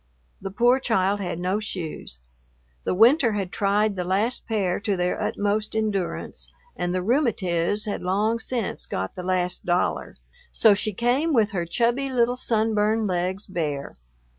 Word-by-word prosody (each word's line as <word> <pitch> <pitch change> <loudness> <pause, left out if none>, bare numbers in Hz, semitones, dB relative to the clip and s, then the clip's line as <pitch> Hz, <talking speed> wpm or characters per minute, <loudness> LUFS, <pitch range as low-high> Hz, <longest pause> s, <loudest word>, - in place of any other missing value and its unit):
The 195 - -4
poor 240 +6 +3
child 205 -5 +1
had 180 -4 -3
no 185 +4 0
shoes. 165 - -6 0.6
The - - 0
winter 235 - +5
had 195 -3 -3
tried 205 +1 +1
the 180 - -2
last 200 +7 -1
pair 200 -5 0
to 205 -2 -1
their 180 0 -1
utmost 210 +1 -1
endurance 210 -5 -2 0.2
and 175 - -2
the 185 0 -1
"rheumatiz" 205 - +1
had 210 - -3
long 210 +5 +1
since 230 -2 -3
got 95 +1 -3
the - - -5
last 180 0 -1
dollar, 175 0 -1 0.3
so 220 - +5
she 210 +2 -1
came 245 - +1
with 225 -4 +3
her 175 -4 -2
chubby 240 +8 +1
little 245 -1 +2
sunburned 220 -2 +1
legs 185 +1 -1
bare. 150 -7 -3
205 Hz, 155 wpm, -24 LUFS, 180-225 Hz, 0.6 s, winter